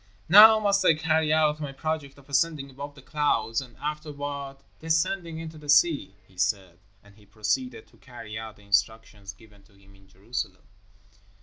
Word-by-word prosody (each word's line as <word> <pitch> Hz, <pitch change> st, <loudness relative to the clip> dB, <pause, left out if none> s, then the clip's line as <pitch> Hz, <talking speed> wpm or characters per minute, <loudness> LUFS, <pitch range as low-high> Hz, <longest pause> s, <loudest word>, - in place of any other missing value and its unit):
"Now 215 Hz, +5 st, +9 dB
must 200 Hz, -2 st, +1 dB
I 165 Hz, -, +5 dB
carry 160 Hz, 0 st, +1 dB
out 155 Hz, -1 st, +2 dB
my 145 Hz, -2 st, -5 dB
project 145 Hz, 0 st, -4 dB
of 140 Hz, -, -19 dB
ascending 140 Hz, 0 st, 0 dB
above 140 Hz, +2 st, -9 dB
the 135 Hz, -, -15 dB
clouds 145 Hz, -7 st, 0 dB
and 125 Hz, -2 st, -13 dB
afterward 145 Hz, -1 st, -6 dB, 0.2 s
descending 165 Hz, +1 st, -1 dB
into 160 Hz, -1 st, -8 dB
the 150 Hz, -1 st, -13 dB
sea," 145 Hz, -, +3 dB
he 95 Hz, -1 st, -18 dB
said, 95 Hz, -3 st, -1 dB, 0.2 s
and 100 Hz, 0 st, -21 dB
he 105 Hz, -, -20 dB
proceeded 110 Hz, +4 st, -3 dB
to -, -, -24 dB
carry 115 Hz, -4 st, -11 dB
out 110 Hz, -1 st, -7 dB
the 105 Hz, -, -20 dB
instructions 100 Hz, 0 st, -1 dB
given 105 Hz, 0 st, -20 dB
to 105 Hz, -, -26 dB
him 100 Hz, 0 st, -22 dB
in 95 Hz, 0 st, -22 dB
Jerusalem. 95 Hz, -1 st, -6 dB
135 Hz, 175 wpm, -26 LUFS, 105-155 Hz, 0.2 s, Now